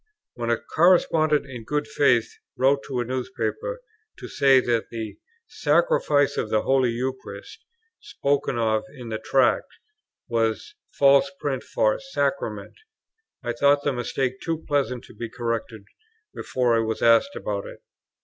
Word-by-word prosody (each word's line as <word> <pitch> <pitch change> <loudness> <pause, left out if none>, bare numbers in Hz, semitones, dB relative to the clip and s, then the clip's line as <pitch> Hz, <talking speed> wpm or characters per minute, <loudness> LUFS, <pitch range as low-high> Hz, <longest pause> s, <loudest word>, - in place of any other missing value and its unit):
When 120 -1 -4
a 120 - +2
correspondent, 155 -3 +3
in 125 -4 -9
good 150 +5 -2
faith, 125 -5 +2 0.2
wrote 135 +2 +3
to 125 -2 -2
a - - -3
newspaper, 315 - -3 0.4
to - - -8
say 135 -2 +4
that 120 -2 -1
the 110 -3 -6 0.3
"Sacrifice 440 - +2
of 110 - -1
the 110 - +1
Holy 135 -2 +2
Eucharist," 130 +2 -6 0.4
spoken 140 -3 -1
of 110 -2 +1
in 125 -3 -9
the 110 -1 -3
Tract, 130 +2 +2 0.6
was 115 - -1
a 340 - -32
false 140 0 +5
print 135 -3 -2
for - - 0
"Sacrament," - - -3 0.7
I 120 - -2
thought 140 +4 +3
the 145 - 0
mistake 130 +1 -2
too 165 -1 -3
pleasant 130 -4 0
to - - -15
be 115 - -6
corrected 115 -3 -4 0.5
before 125 -2 0
I - - +3
was 110 0 -2
asked 115 - +4
about 100 -1 -4
it. - - -12
130 Hz, 150 wpm, -24 LUFS, 115-145 Hz, 0.7 s, false